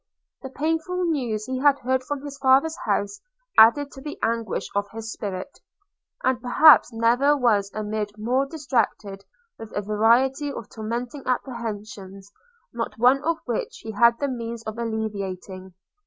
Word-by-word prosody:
The 265 - -7
painful 325 +6 -2
news 245 -10 -1
he 255 +1 -3
had 285 0 +4
heard 260 +1 0
from 285 +1 -5
his 285 -1 -7
father's 275 +4 +4
house 205 0 -1 0.3
added 275 +6 +6
to 270 - -11
the 295 +1 -7
anguish 230 -2 -1
of 200 0 -1
his 225 0 -7
spirit; 195 +5 -6 0.6
and 260 -2 +1
perhaps 265 +2 +6
never 240 +6 +3
was 210 -6 +2
a 215 - -3
mind 210 0 -3
more 250 +6 0
distracted 230 -9 -2 0.3
with 225 -1 -9
a 205 - -1
variety 240 +7 +2
of 230 - -8
tormenting 235 +5 -5
apprehensions, 210 -6 -5 0.4
not 230 -1 -4
one 255 +4 +4
of 330 +1 0
which 485 -2 -4
he 220 - -5
had 235 +2 +4
the 285 - 0
means 235 -3 -5
of 220 +1 -6
alleviating. 195 -5 -5
235 Hz, 155 wpm, -24 LUFS, 215-275 Hz, 0.6 s, added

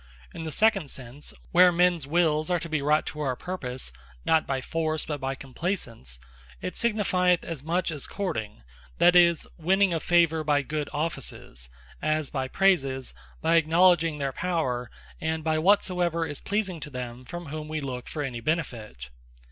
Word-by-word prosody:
In 160 - -6
the 160 - -3
second 195 -4 +2
sense, 130 +3 -8 0.2
where 180 +1 +7
mens 175 -4 +2
wills 155 -1 +2
are 180 - +3
to 170 - -5
be 155 -3 -1
wrought 150 +2 +2
to 150 - -6
our 135 -4 0
purpose, 130 - -4 0.3
not 160 -1 +3
by 135 -1 0
Force, 155 +2 -1
but 150 -2 -4
by 135 0 -2
Compleasance, 130 - -4 0.4
it 90 - -5
signifieth 185 -6 +2
as 165 -5 -5
much 170 +3 0
as 150 -4 -4
Courting, 110 - -4 0.3
that 175 0 +5
is, 170 -2 +5
a - - -22
winning 190 +2 +3
of 165 - -1
favour 165 -2 +3
by 145 -2 +2
good 150 +1 -3
offices; 135 - -5 0.3
as 155 -1 0
by 135 -3 -2
praises, 135 -7 +1 0.3
by 165 +1 +4
acknowledging 165 0 +4
their 140 -2 -2
Power, 130 -10 -1 0.3
and 160 0 -2
by 155 0 +1
whatsoever 175 -2 +2
is 145 -3 -6
pleasing 200 -4 -1
to 150 - -6
them 125 -2 -6
from 175 +6 -7
whom 155 +1 -6
we 155 0 -3
look 125 -4 -5
for 150 - -4
any 125 -4 -4
benefit. 115 - -3
155 Hz, 170 wpm, -27 LUFS, 135-175 Hz, 0.4 s, where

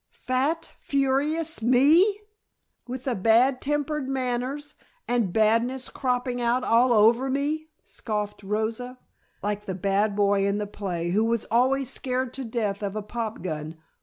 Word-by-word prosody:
Fat, 285 +6 0
furious 285 +3 0
me! 300 - +4 0.7
With 255 +1 -6
the 260 - -1
bad 235 +6 +3
tempered 295 -1 -1
manners, 265 +3 -2 0.3
and 235 -6 +1
badness 230 +5 +2
cropping 250 -1 -1
out 240 +2 +1
all 240 +2 +4
over 235 +4 +4
me!" 295 +4 -1 0.2
scoffed 210 -2 -4
Rosa. 220 +5 -3 0.5
"Like 210 0 -2
the 190 - -4
bad 200 +2 +1
boy 200 -1 +2
in 200 +1 0
the 210 - -2
play 180 -4 -4
who 210 +4 +2
was 230 0 0
always 260 +3 +2
scared 255 -1 -2
to 270 - -5
death 220 -4 -2
of 200 0 -3
a 215 - -3
pop 225 0 -5
gun. 155 -2 -5
245 Hz, 145 wpm, -25 LUFS, 210-265 Hz, 0.7 s, me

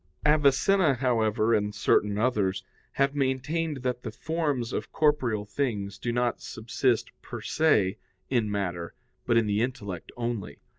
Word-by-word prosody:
Avicenna, 150 +3 +4
however, 115 -3 +2
and 105 -1 0
certain 105 -1 +2
others, 105 -5 +1 0.3
have 140 0 +2
maintained 140 +2 -1
that 125 -1 -1
the - - -5
forms 145 -7 -2
of - - -3
corporeal 130 -9 +1
things 100 -4 -2
do 120 - -2
not 120 0 0
subsist 115 +1 -1
per - - -7
se 105 -12 +2 0.3
in 120 -5 +1
matter, 90 -4 -3 0.3
but 120 - +4
in 115 - +4
the 105 +1 +1
intellect 100 -8 -4
only. 115 -11 -3
120 Hz, 140 wpm, -27 LUFS, 105-135 Hz, 0.3 s, Avicenna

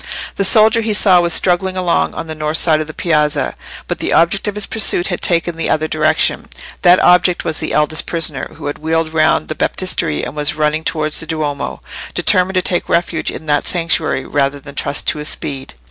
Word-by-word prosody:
The 200 - 0
soldier 220 +3 +5
he 220 -1 -1
saw 185 -4 +4
was 170 0 0
struggling 185 +2 +2
along 180 -2 0
on - - -5
the 160 - -6
north 155 0 -2
side 155 -2 +2
of 155 - -5
the - - -7
piazza, 150 -3 0 0.3
but - - -3
the - - -1
object 170 +5 +2
of 205 - -3
his 210 -1 0
pursuit 200 -5 +2
had 175 - -4
taken 170 -1 +1
the 165 - -2
other 155 0 0
direction. 155 0 0 0.3
That 180 0 +6
object 180 0 +3
was 160 -2 -2
the - - -3
eldest 150 +1 0
prisoner, 160 -5 -2
who 155 - -10
had 145 - -4
wheeled 160 0 -1
round 155 - +2
the - - -3
Baptistery 75 - -1
and 125 - -6
was 150 0 -1
running 155 +1 0
towards 155 -1 0
the 165 - -3
Duomo, 150 -3 -4 0.3
determined 185 +1 +2
to 185 - +1
take 175 - 0
refuge 170 -1 0
in 160 - -7
that 145 -1 0
sanctuary 165 -6 0
rather 140 0 -1
than 140 +1 -12
trust 140 - -1
to 150 - -2
his 150 - -4
speed. 135 - -4
160 Hz, 210 wpm, -16 LUFS, 150-180 Hz, 0.3 s, That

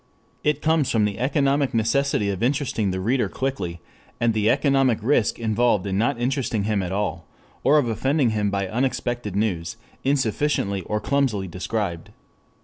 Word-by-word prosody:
It 150 0 0
comes 155 -4 +2
from 110 -4 +2
the 105 +1 -3
economic 140 0 +1
necessity 115 -2 +1
of 95 - -5
interesting 125 -5 0
the 95 0 -2
reader 120 +7 +1
quickly, 95 -11 -3 0.4
and 115 -1 +2
the 110 0 +2
economic 135 -3 +3
risk 120 -3 +2
involved 110 -3 +1
in 95 -1 -2
not 115 +1 +1
interesting 120 -4 -1
him 105 -1 0
at 90 -1 -4
all, 90 -5 -2 0.4
or 145 +3 +5
of 140 -5 +2
offending 130 +3 +1
him 105 -1 0
by 100 -1 -1
unexpected 120 -2 -2
news 100 -2 -1 0.3
insufficiently 130 -6 0
or 105 - -1
clumsily 125 -8 0
described. 90 -1 -3
115 Hz, 155 wpm, -23 LUFS, 100-135 Hz, 0.4 s, or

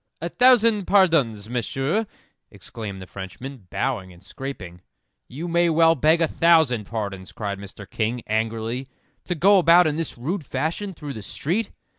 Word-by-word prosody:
"A 170 - -4
thousand 230 -4 +4
pardons, 155 - +3
Monsieur!" 135 - -1 0.4
exclaimed 100 -4 -8
the - - -10
Frenchman, 100 +5 -9
bowing 115 -9 -2
and 90 +1 -17
scraping. 95 -6 -8 0.5
"You 155 +7 -6
may 170 0 +2
well 165 0 +5
beg 160 +2 +3
a 165 - +4
thousand 160 -10 +3
pardons," 100 -4 -5
cried 100 -2 -5
Mr. 100 0 -11
King, 115 +3 -2
angrily, 115 +3 -2 0.4
"to 180 - -2
go 195 +5 +5
about 175 +1 +6
in 155 -1 0
this 165 -5 -3
rude 160 +9 -3
fashion 160 +9 -3
through 145 -2 -7
the 110 - -7
street." 180 - -2
135 Hz, 155 wpm, -23 LUFS, 110-170 Hz, 0.5 s, about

